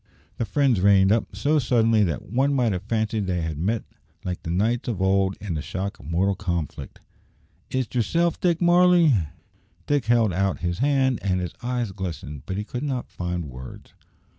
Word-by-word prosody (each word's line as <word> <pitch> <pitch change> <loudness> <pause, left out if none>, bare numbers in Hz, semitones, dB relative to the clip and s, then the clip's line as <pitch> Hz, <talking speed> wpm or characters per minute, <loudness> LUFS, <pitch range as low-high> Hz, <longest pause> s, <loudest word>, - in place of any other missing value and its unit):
The 115 - -1
friends 130 -6 +2
reined 95 -1 +5
up 115 +1 0
so 150 +1 +2
suddenly 115 -4 +3
that 80 -7 -3
one 135 +6 +1
might 120 -4 +2
have 90 -2 -2
fancied 110 -2 -1
they 90 -2 -1
had 80 -2 -4
met 105 +6 0 0.4
like 90 -1 -4
the - - -6
knights 110 +8 0
of 110 -6 -3
old 95 0 +2
in 100 -3 -4
the 75 - -2
shock 100 +7 -4
of - - -12
mortal 95 +4 +2
conflict. 85 -6 -4 0.7
"Is't 130 -2 -2
yerself, 165 +8 +1
Dick 175 -2 +1
Varley?" 175 -3 +5 0.7
Dick 145 -3 +1
held 115 -4 +3
out 95 +1 0
his 85 +1 -2
hand, 135 -2 +2
and 95 -2 0
his 90 -2 -4
eyes 120 -3 -2
glistened, 80 -7 -6
but 95 - -3
he 105 - -2
could 120 +3 -5
not 135 -4 -3
find 90 -1 -3
words. 65 -2 -10
105 Hz, 185 wpm, -24 LUFS, 90-125 Hz, 0.7 s, reined